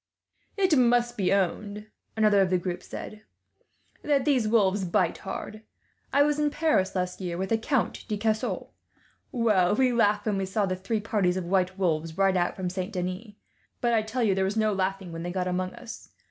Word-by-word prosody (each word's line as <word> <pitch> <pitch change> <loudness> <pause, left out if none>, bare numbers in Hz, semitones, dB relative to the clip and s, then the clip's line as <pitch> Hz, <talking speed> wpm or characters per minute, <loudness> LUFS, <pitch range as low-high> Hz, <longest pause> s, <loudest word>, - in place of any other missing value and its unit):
"It 380 -5 +3
must 240 -1 +3
be 195 -5 0
owned," 205 +2 -1 0.3
another 210 -2 +4
of 190 - +2
the 185 - +3
group 180 0 -4
said, 215 0 -8 0.8
"that 285 -3 +1
these 260 -7 +2
wolves 205 -3 +2
bite 175 -1 0
hard. 215 0 -6 0.5
I 285 - +5
was 295 0 +1
in 300 0 +2
Paris 290 -12 +1
last 180 +1 -2
year, 175 -2 -3
with 190 +1 -3
the 225 - +3
Count 260 +2 -1
de 210 -3 -2
Caussac. 220 +1 -1 0.6
Well, 210 -6 +2
we 255 +1 +3
laughed 210 -3 +2
when 210 -3 0
we 195 -1 -2
saw 200 +2 0
the 185 -1 -1
three 210 +4 -2
parties 195 -4 0
of 185 - -3
white 185 +1 0
wolves 165 -3 -1
ride 195 -1 +3
out 175 -1 +1
from 185 -1 -3
Saint 185 +3 -4
Denis; 185 +4 -4 0.5
but 240 -1 +1
I 225 - +4
tell 225 +3 -2
you, 205 -3 +3
there 190 0 +1
was 195 +3 -1
no 215 -1 +2
laughing 190 -1 -2
when 165 0 -6
they 175 +1 -4
got 180 0 -2
among 185 0 -2
us. 235 - -10
200 Hz, 200 wpm, -27 LUFS, 185-225 Hz, 0.8 s, I